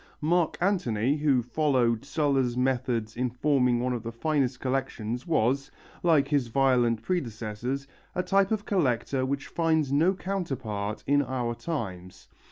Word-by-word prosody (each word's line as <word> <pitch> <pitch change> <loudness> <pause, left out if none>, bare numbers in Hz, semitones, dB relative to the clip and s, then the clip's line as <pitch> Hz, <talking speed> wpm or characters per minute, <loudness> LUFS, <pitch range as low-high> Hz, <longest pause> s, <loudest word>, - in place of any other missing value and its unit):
Mark 165 +2 +1
Antony, 145 - +1
who 140 -5 +2
followed 125 -3 +1
Sulla's 140 -4 0
methods 125 -4 0
in 125 +1 0
forming 125 -1 +2
one 125 +1 0
of 120 - -3
the 115 - -5
finest 135 +1 0
of - - -24
collections, 130 -2 -2
was, 135 -3 +1 0.3
like 155 -5 +3
his 140 -5 +1
violent 120 -3 +2
predecessors, 120 - -3 0.3
a 180 - 0
type 195 0 +3
of 215 -2 -1
collector 130 - 0
which 140 0 -2
finds 160 -4 +1
no 165 +7 +3
counterpart 130 - -3
in 145 +1 +3
our 125 -3 -2
times. 95 - -6
130 Hz, 145 wpm, -27 LUFS, 120-150 Hz, 0.3 s, like